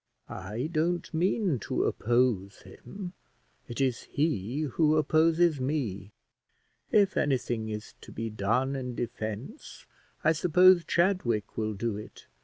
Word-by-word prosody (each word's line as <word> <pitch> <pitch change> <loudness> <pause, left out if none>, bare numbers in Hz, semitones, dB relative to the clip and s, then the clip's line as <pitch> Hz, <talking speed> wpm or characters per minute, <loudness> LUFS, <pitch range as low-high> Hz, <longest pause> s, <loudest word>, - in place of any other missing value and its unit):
"I 110 - -4
don't 170 +2 -1
mean 180 - +1
to - - -1
oppose 115 -5 0
him; 175 - -9 0.5
it 120 - -6
is 130 -3 +1
he 140 - -1
who 155 +2 +2
opposes 160 +1 +3
me; 120 -9 -2 0.8
if 200 -2 +4
anything 120 -5 0
is 105 0 -6
to - - -12
be 115 -1 -4
done 115 +7 0
in 125 -2 -4
defence, 110 0 -6 0.4
I 155 - +5
suppose 180 +2 +5
Chadwick 170 - +1
will 110 -1 -2
do 110 0 -2
it. 105 - -11
130 Hz, 125 wpm, -28 LUFS, 110-160 Hz, 0.8 s, I